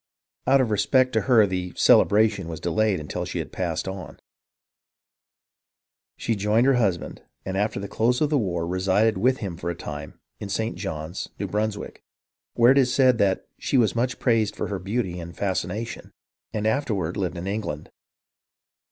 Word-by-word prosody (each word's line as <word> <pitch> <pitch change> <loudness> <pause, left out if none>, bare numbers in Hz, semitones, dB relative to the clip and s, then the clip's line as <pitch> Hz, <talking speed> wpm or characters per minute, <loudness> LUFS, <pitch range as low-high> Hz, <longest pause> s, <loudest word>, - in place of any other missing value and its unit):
Out 135 0 +5
of 120 -4 0
respect 130 +5 +2
to - - +2
her 115 -4 +7
the 90 -2 -3
"celebration" 105 -3 +4
was 80 -2 -6
delayed 100 +3 +1
until 75 - -4
she - - -5
had - - -4
passed - - -2
on. 95 -1 -7 2.0
She - - -3
rejoined 105 +3 +2
her 135 - +5
husband 100 -9 -1 0.2
and 95 - -3
after 105 +1 0
the 100 - -5
close 120 +5 +1
of 150 -1 +1
the 150 - +3
war 85 -6 -1
resided 95 +5 +1
with 130 +2 +3
him 85 -4 -5
for 85 0 -4
a 85 - -3
time 75 -3 -8 0.2
in 100 - -6
St. 110 +3 -2
Johns, 80 +3 -5
New 100 - -3
Brunswick, 105 +1 -3 0.5
where 120 +2 +6
it 140 - +5
is 125 -2 +3
said 120 -7 +3 0.2
"she 135 - 0
was 115 -4 +3
much 125 +2 0
praised 110 -4 +1
for - - -3
her 100 -2 -3
beauty 95 -2 -2
and 85 0 -9
fascination," 100 +3 -3 0.4
and 105 -1 -3
afterward 110 - 0
lived 90 -3 -2
in 85 - -5
England. 100 -7 -4
105 Hz, 170 wpm, -24 LUFS, 90-115 Hz, 2.0 s, her